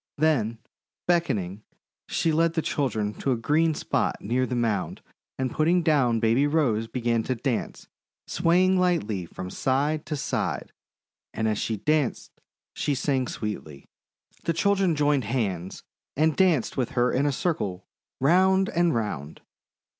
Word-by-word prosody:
Then, 135 Hz, -8 st, +1 dB, 0.5 s
beckoning, 110 Hz, -, 0 dB, 0.5 s
she 165 Hz, -, 0 dB
led 165 Hz, +1 st, +2 dB
the 160 Hz, -, -1 dB
children 110 Hz, -7 st, -1 dB
to 135 Hz, -, +1 dB
a -, -, -1 dB
green 155 Hz, +7 st, +2 dB
spot -, -, 0 dB
near 125 Hz, +5 st, 0 dB
the 125 Hz, -, -2 dB
mound 115 Hz, -4 st, -1 dB, 0.3 s
and, 130 Hz, -1 st, -1 dB
putting 170 Hz, +3 st, +2 dB
down 135 Hz, -8 st, +3 dB
Baby 115 Hz, +5 st, +3 dB
Rose, 125 Hz, -8 st, +1 dB
began 115 Hz, -1 st, 0 dB
to 130 Hz, +3 st, -2 dB
dance, 125 Hz, 0 st, -3 dB, 0.4 s
swaying 185 Hz, +2 st, +3 dB
lightly 110 Hz, -, 0 dB
from 90 Hz, +2 st, -7 dB
side 145 Hz, +4 st, 0 dB
to 155 Hz, -, -2 dB
side; 140 Hz, -, -2 dB, 0.6 s
and 110 Hz, -, 0 dB
as 105 Hz, -1 st, 0 dB
she 110 Hz, -, -2 dB
danced 150 Hz, +4 st, 0 dB, 0.4 s
she 145 Hz, -, -1 dB
sang 130 Hz, -1 st, 0 dB
sweetly. 80 Hz, -12 st, -6 dB, 0.6 s
The 165 Hz, -, +1 dB
children 195 Hz, 0 st, +2 dB
joined 145 Hz, -4 st, +2 dB
hands 100 Hz, -6 st, -2 dB, 0.3 s
and 155 Hz, +1 st, +3 dB
danced 175 Hz, -, +2 dB
with 125 Hz, -3 st, -1 dB
her 120 Hz, +1 st, +3 dB
in 140 Hz, +3 st, +1 dB
a -, -, +2 dB
circle, 125 Hz, -, -2 dB, 0.3 s
round 190 Hz, +6 st, +4 dB
and 170 Hz, -1 st, +2 dB
round. 80 Hz, -10 st, -4 dB
135 Hz, 145 wpm, -26 LUFS, 110-160 Hz, 0.6 s, round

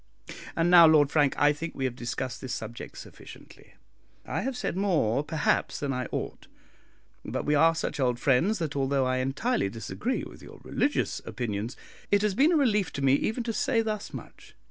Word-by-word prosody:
And 170 Hz, +1 st, +2 dB
now, 170 Hz, -2 st, +9 dB
Lord 150 Hz, -3 st, +5 dB
Frank, 145 Hz, -3 st, +2 dB
I 145 Hz, 0 st, +5 dB
think 160 Hz, +3 st, -6 dB
we 135 Hz, -, -2 dB
have 125 Hz, -2 st, -2 dB
discussed 125 Hz, +1 st, -4 dB
this 130 Hz, -, -4 dB
subject 115 Hz, +2 st, -8 dB
sufficiently. -, -, -13 dB, 0.5 s
I -, -, -2 dB
have 265 Hz, -1 st, -3 dB
said -, -, -3 dB
more, 160 Hz, -, +1 dB
perhaps, 150 Hz, 0 st, 0 dB
than 140 Hz, -2 st, -2 dB
I 125 Hz, -1 st, -3 dB
ought; -, -, -5 dB, 0.8 s
but -, -, -4 dB
we 150 Hz, -, +2 dB
are 165 Hz, +3 st, +4 dB
such 160 Hz, -, -3 dB
old 125 Hz, -2 st, +1 dB
friends 145 Hz, -, +2 dB
that, 160 Hz, -5 st, -3 dB
although 135 Hz, -1 st, +1 dB
I 130 Hz, 0 st, 0 dB
entirely 135 Hz, -, 0 dB
disagree 165 Hz, -, -3 dB
with -, -, -11 dB
your -, -, -13 dB
religious 290 Hz, -, -1 dB
opinions, 110 Hz, 0 st, -4 dB, 0.3 s
it 205 Hz, 0 st, +3 dB
has 210 Hz, -2 st, +1 dB
been 280 Hz, -, +4 dB
a 335 Hz, -, +4 dB
relief 210 Hz, -, +2 dB
to 140 Hz, -, -4 dB
me 135 Hz, -1 st, +4 dB
even 220 Hz, -, 0 dB
to 230 Hz, -1 st, -3 dB
say 230 Hz, -1 st, +1 dB
thus 215 Hz, -2 st, -4 dB
much. -, -, -11 dB
150 Hz, 190 wpm, -27 LUFS, 130-205 Hz, 0.8 s, now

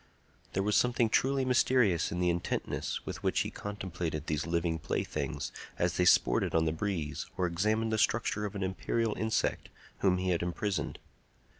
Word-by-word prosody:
There 95 Hz, -, +1 dB
was 105 Hz, +1 st, +1 dB
something 120 Hz, -2 st, +3 dB
truly 135 Hz, +2 st, +2 dB
mysterious 125 Hz, -8 st, +3 dB
in 85 Hz, -, -2 dB
the 90 Hz, -1 st, +3 dB
intentness 85 Hz, 0 st, -2 dB
with -, -, -5 dB
which -, -, +1 dB
he -, -, -3 dB
contemplated 90 Hz, -7 st, -4 dB
these 75 Hz, +1 st, -1 dB
living 85 Hz, -1 st, 0 dB
playthings -, -, -3 dB, 0.3 s
as -, -, 0 dB
they -, -, +3 dB
sported -, -, +4 dB
on 80 Hz, 0 st, +3 dB
the 80 Hz, -, +2 dB
breeze 80 Hz, -3 st, -3 dB
or 90 Hz, -, +1 dB
examined 110 Hz, +6 st, +1 dB
the 110 Hz, -, +1 dB
structure 110 Hz, -1 st, +1 dB
of 105 Hz, -1 st, -4 dB
an 100 Hz, -, -2 dB
imperial 105 Hz, +4 st, -1 dB
insect 110 Hz, 0 st, -1 dB, 0.3 s
whom 95 Hz, -2 st, +3 dB
he 90 Hz, 0 st, 0 dB
had 85 Hz, -, +1 dB
imprisoned. 90 Hz, +3 st, -2 dB
95 Hz, 170 wpm, -31 LUFS, 85-110 Hz, 0.3 s, sported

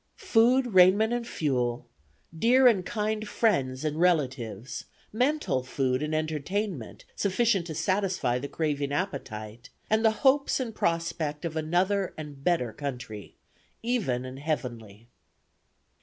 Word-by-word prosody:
Food, 250 Hz, -, +3 dB
raiment 190 Hz, +5 st, +6 dB
and 240 Hz, -1 st, -2 dB
fuel, 125 Hz, -, -1 dB, 0.5 s
dear 250 Hz, +9 st, +4 dB
and 220 Hz, -7 st, +5 dB
kind 215 Hz, +2 st, -2 dB
friends 135 Hz, -, +1 dB
and 155 Hz, +1 st, -1 dB
relatives, 130 Hz, -, 0 dB, 0.3 s
mental 255 Hz, -, +1 dB
food 130 Hz, 0 st, -1 dB
and 155 Hz, +1 st, -1 dB
entertainment 155 Hz, -, -3 dB
sufficient 200 Hz, -2 st, +1 dB
to 160 Hz, -, -5 dB
satisfy 180 Hz, -7 st, 0 dB
the 140 Hz, -, -5 dB
craving 145 Hz, -2 st, -2 dB
appetite, 120 Hz, -, -4 dB, 0.2 s
and 220 Hz, +1 st, +3 dB
the 220 Hz, -, +6 dB, 0.2 s
hopes 275 Hz, +1 st, +4 dB
and 240 Hz, -4 st, -3 dB
prospect 165 Hz, -4 st, -1 dB
of 165 Hz, -1 st, -4 dB
another 180 Hz, +5 st, 0 dB
and 145 Hz, -3 st, -8 dB
better 135 Hz, -10 st, +1 dB
country, 125 Hz, -6 st, -6 dB, 0.5 s
even 195 Hz, -, 0 dB
an 130 Hz, +1 st, -7 dB
heavenly. 120 Hz, -8 st, -4 dB
160 Hz, 125 wpm, -28 LUFS, 130-210 Hz, 0.5 s, raiment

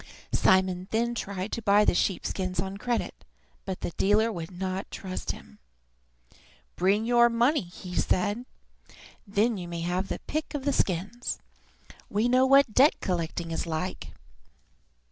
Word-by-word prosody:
Simon 185 Hz, -1 st, +3 dB
then 235 Hz, +2 st, 0 dB
tried 200 Hz, -3 st, -4 dB
to 230 Hz, -, -3 dB
buy 205 Hz, 0 st, +4 dB
the -, -, +4 dB
sheep 180 Hz, +1 st, 0 dB
skins 185 Hz, -2 st, -2 dB
on 190 Hz, +2 st, -3 dB
credit, 240 Hz, +2 st, -3 dB, 0.4 s
but 190 Hz, -2 st, -4 dB
the -, -, -3 dB
dealer 210 Hz, +6 st, +2 dB
would 170 Hz, -5 st, -5 dB
not 185 Hz, +1 st, -4 dB
trust 185 Hz, -1 st, -6 dB
him. 70 Hz, 0 st, -7 dB, 1.2 s
"Bring 200 Hz, +4 st, +2 dB
your 240 Hz, 0 st, +5 dB
money," 235 Hz, -, +2 dB
said 180 Hz, +3 st, -1 dB
he, -, -, -29 dB, 0.3 s
"then 210 Hz, +3 st, +1 dB
you 175 Hz, -2 st, -6 dB
may 170 Hz, -1 st, -5 dB
have 180 Hz, +3 st, -1 dB
your -, -, -2 dB
pick 310 Hz, 0 st, -3 dB
of 280 Hz, -2 st, -4 dB
the 285 Hz, -, +2 dB
skins. 200 Hz, +6 st, -1 dB, 0.7 s
We 210 Hz, +3 st, +1 dB
know 255 Hz, +2 st, +4 dB
what 275 Hz, -4 st, +5 dB
debt 275 Hz, +6 st, +5 dB
collecting 170 Hz, -2 st, -2 dB
is 165 Hz, -, -2 dB
like." 165 Hz, +3 st, -3 dB
195 Hz, 150 wpm, -27 LUFS, 180-235 Hz, 1.2 s, your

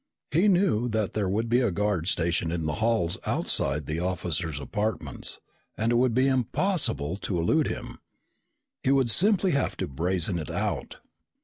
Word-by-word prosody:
He 170 Hz, +8 st, +3 dB
knew 175 Hz, -, +3 dB
that 110 Hz, -3 st, -1 dB
there 100 Hz, -3 st, 0 dB
would 110 Hz, +4 st, 0 dB
be 120 Hz, +2 st, +3 dB
a 120 Hz, -, +2 dB
guard 100 Hz, -3 st, -1 dB
stationed 85 Hz, -2 st, +1 dB
in 85 Hz, -2 st, -2 dB
the 75 Hz, -, -1 dB
halls 110 Hz, -7 st, +1 dB
outside 70 Hz, +1 st, 0 dB
the 80 Hz, +3 st, -2 dB
officers' 85 Hz, -4 st, -2 dB
apartments 105 Hz, +5 st, -3 dB, 0.4 s
and 115 Hz, +2 st, +1 dB
it -, -, +3 dB
would 120 Hz, -1 st, +2 dB
be 130 Hz, +1 st, +4 dB
impossible 130 Hz, -, +1 dB
to 95 Hz, -2 st, -3 dB
elude 135 Hz, -, +2 dB
him. -, -, -6 dB, 0.8 s
He -, -, 0 dB
would 135 Hz, -3 st, +3 dB
simply 195 Hz, -, +3 dB
have 140 Hz, -3 st, 0 dB
to -, -, -2 dB
brazen 85 Hz, +5 st, -1 dB
it 75 Hz, -, -6 dB
out. -, -, -3 dB
105 Hz, 170 wpm, -27 LUFS, 85-130 Hz, 0.8 s, be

